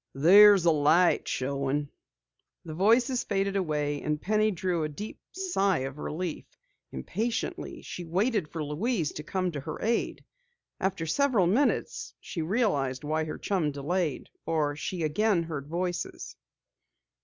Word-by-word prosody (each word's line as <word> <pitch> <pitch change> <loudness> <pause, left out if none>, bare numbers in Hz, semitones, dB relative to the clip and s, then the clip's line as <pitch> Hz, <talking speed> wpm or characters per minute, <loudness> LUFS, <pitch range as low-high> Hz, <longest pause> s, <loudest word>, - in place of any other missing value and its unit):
"There's 195 +5 +7
a 170 - +6
light 160 +4 +3
showing." 140 +2 -1 0.8
The 160 - -6
voices 235 - +3
faded 195 -1 -1
away, 150 -6 -1
and 150 0 -1
Penny 215 +5 +2
drew 180 -3 -1
a 155 - -2
deep 210 +9 -8
sigh 200 - 0
of 135 +2 -7
relief. 170 +2 -4 0.5
Impatiently 220 - -3
she 175 - -6
waited 190 +2 0
for 160 0 -5
Louise 165 - -1
to 150 - -7
come 185 +2 -1
to 150 - -5
her 155 +3 -6
aid. 230 +1 -1 0.5
After 190 -3 -1
several 235 - +2
minutes 285 - 0
she 170 - -5
realized 155 - 0
why 155 +1 -1
her 155 - -5
chum 180 -7 0
delayed, 150 +2 -2
for 155 -3 0
she 170 +3 -4
again 175 +4 +2
heard 150 -4 -6
voices. 175 +2 -4
170 Hz, 140 wpm, -28 LUFS, 150-200 Hz, 0.8 s, There's